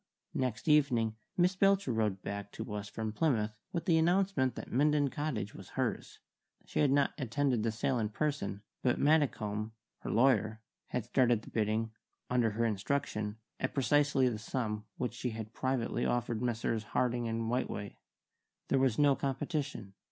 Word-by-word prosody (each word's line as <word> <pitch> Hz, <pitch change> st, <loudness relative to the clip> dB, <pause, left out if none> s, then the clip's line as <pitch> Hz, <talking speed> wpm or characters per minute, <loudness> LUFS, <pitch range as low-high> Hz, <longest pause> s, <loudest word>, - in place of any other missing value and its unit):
Next 125 Hz, -2 st, -2 dB
evening 125 Hz, -8 st, +3 dB, 0.2 s
Miss 180 Hz, +1 st, +3 dB
Belcher 195 Hz, -8 st, +3 dB
rode 105 Hz, -4 st, 0 dB
back 100 Hz, 0 st, -5 dB
to -, -, -6 dB
us 105 Hz, -1 st, -4 dB
from 110 Hz, 0 st, -3 dB
Plymouth 110 Hz, -5 st, +1 dB, 0.2 s
with 170 Hz, -, -3 dB
the 165 Hz, -4 st, +4 dB
announcement 175 Hz, -6 st, +2 dB
that -, -, -7 dB
Minden 145 Hz, +1 st, +3 dB
Cottage 125 Hz, -10 st, -3 dB
was -, -, -11 dB
hers. -, -, -2 dB, 0.5 s
She -, -, -3 dB
had 145 Hz, -, +4 dB
not 140 Hz, 0 st, +3 dB
attended 130 Hz, -1 st, +1 dB
the 115 Hz, +1 st, +1 dB
sale 120 Hz, +3 st, 0 dB
in 105 Hz, -2 st, 0 dB
person, 110 Hz, -6 st, -2 dB, 0.2 s
but 125 Hz, -, +2 dB
Maddicombe, 110 Hz, -8 st, +1 dB, 0.3 s
her -, -, -6 dB
lawyer, 110 Hz, -3 st, +3 dB, 0.3 s
had -, -, -2 dB
started 120 Hz, -4 st, +3 dB
the -, -, -12 dB
bidding 110 Hz, 0 st, 0 dB, 0.4 s
(under 120 Hz, -2 st, +3 dB
her 115 Hz, +2 st, 0 dB
instruction) 105 Hz, -1 st, -1 dB, 0.2 s
at 130 Hz, -, -2 dB
precisely 140 Hz, 0 st, +3 dB
the 115 Hz, -4 st, -1 dB
sum 110 Hz, -2 st, -3 dB
which 125 Hz, -2 st, -2 dB
she 125 Hz, +1 st, -3 dB
had 110 Hz, 0 st, -6 dB
privately 130 Hz, -2 st, -1 dB
offered 120 Hz, -2 st, 0 dB
Messrs. 115 Hz, -2 st, 0 dB
Harding 120 Hz, +2 st, 0 dB
and 115 Hz, 0 st, -2 dB
Whiteway. 105 Hz, -4 st, -2 dB, 0.7 s
There 135 Hz, -, +3 dB
was 130 Hz, -4 st, +2 dB
no 145 Hz, -2 st, +5 dB
competition. 135 Hz, -, -3 dB
120 Hz, 160 wpm, -32 LUFS, 110-140 Hz, 0.7 s, no